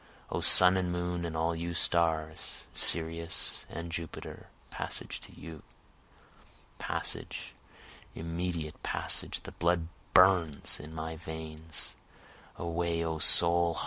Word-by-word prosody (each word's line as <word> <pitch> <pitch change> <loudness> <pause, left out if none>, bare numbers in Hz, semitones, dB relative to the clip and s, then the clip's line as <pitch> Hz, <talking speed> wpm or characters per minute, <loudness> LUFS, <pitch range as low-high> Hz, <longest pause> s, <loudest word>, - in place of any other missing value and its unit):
O - - -1
sun 90 0 +8
and 90 -1 -1
moon 90 0 -2
and 80 -1 -4
all 80 +1 0
you 85 +1 -4
stars! 80 -3 0
Sirius 80 0 +1
and 85 0 -6
Jupiter! 85 -1 -7 0.2
Passage - - -5
to - - -12
you! 80 -2 -9 1.2
Passage, - - -4 0.6
immediate 85 -1 -4
passage! - - -3
the - - -9
blood 85 -1 0 0.3
burns 90 -5 +4
in 75 +2 -10
my 80 0 -5
veins! 80 -2 -6 0.6
Away 85 0 -2
O 80 -1 -2
soul! 85 +1 +6
85 Hz, 110 wpm, -30 LUFS, 80-85 Hz, 1.2 s, sun